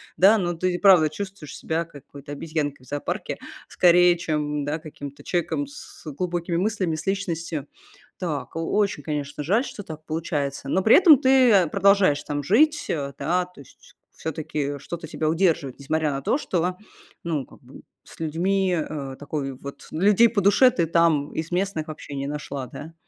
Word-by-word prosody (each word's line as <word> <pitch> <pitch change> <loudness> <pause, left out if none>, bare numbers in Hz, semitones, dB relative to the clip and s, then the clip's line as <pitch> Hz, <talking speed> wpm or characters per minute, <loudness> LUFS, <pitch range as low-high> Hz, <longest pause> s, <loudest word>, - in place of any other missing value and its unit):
Да, 205 +4 +6
но 175 -3 -1
ты 180 +2 -1
и - - -1
правда 180 -6 +6
чувствуешь 190 -3 -7
себя 165 +1 -2
какой-то 145 -1 -11
обезьянкой 145 -4 -4
в - - -18
зоопарке 145 0 -3 0.3
скорее, 175 0 +5
чем, 150 -3 -2
да, 150 +2 -1
каким-то 145 -3 -10
человеком 180 - -1
с 290 - -12
глубокими 175 +2 -2
мыслями, 190 -4 0
с 160 +4 -7
личностью. 170 -6 -2 0.5
Так, 160 -4 -4
о - - -2 0.2
очень, 200 -8 +1
конечно, 145 0 -4
жаль, 215 - +2
что 205 - -7
так 155 -4 -10
получается, 145 -4 -3
но 190 +4 +1
при 220 - +7
этом 325 -7 +8
ты, 260 -2 +5
э, 185 -5 +5
продолжаешь 195 -4 +3
там 145 -1 -3
жить, 300 - +3
э, 140 -3 -3
да, 175 +5 0
то 180 -5 -16
есть 135 - -19 0.2
всё-таки 150 -2 -3
что-то 160 +4 -7
тебя 155 -1 -1
удерживает, 165 -6 +1
несмотря 155 +1 0
на 135 0 -3
то, 260 - +1
что, 180 - -1 0.5
ну 155 -6 -2
как - - -18
бы, - - -15 0.2
с - - -16
людьми, 180 +4 0
э, 140 -4 -4
такой, 145 -2 -4
вот 140 +2 -10
людей 205 +7 +5
по 215 -3 0
душе 205 +7 +6
ты 170 -6 0
там 165 -3 +2
из 160 +2 -4
местных 180 -4 -1
вообще 150 -2 -8
не 140 0 -3
нашла, 140 -3 -5
да? 160 +6 -10
165 Hz, 175 wpm, -24 LUFS, 145-185 Hz, 0.5 s, этом